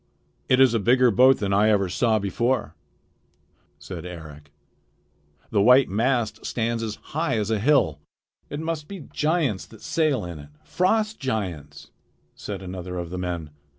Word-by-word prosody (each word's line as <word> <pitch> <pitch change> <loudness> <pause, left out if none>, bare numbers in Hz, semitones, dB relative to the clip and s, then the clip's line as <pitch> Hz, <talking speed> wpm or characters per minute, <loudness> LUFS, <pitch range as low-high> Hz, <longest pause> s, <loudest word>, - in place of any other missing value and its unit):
"It 130 - +4
is 130 -3 +6
a 115 - +2
bigger 125 +3 +4
boat 130 +4 +6
than 100 -1 -1
I 105 +2 +4
ever 100 -3 +2
saw 110 +5 +1
before," 120 +6 -1 1.0
said 90 -4 -8
Eric. 75 -5 -10 1.0
"The 105 - +3
white 125 +5 +6
mast 110 +1 0
stands 115 0 -2
as 110 -2 -3 0.2
high 160 -5 0
as 105 0 -1
a 110 - +1
hill." 120 - +2 0.5
"It 145 - -5
must 160 -2 -4
be 195 -3 -8
giants 150 - 0
that 110 - -16
sail 155 - 0
in 85 -3 -7
it, 70 0 -12
frost 215 +4 0
giants," 100 - -4 0.4
said 100 -2 -7
another 90 -1 -6
of 85 -1 -5
the 90 - -4
men. 85 -4 -4
110 Hz, 155 wpm, -24 LUFS, 90-130 Hz, 1.0 s, is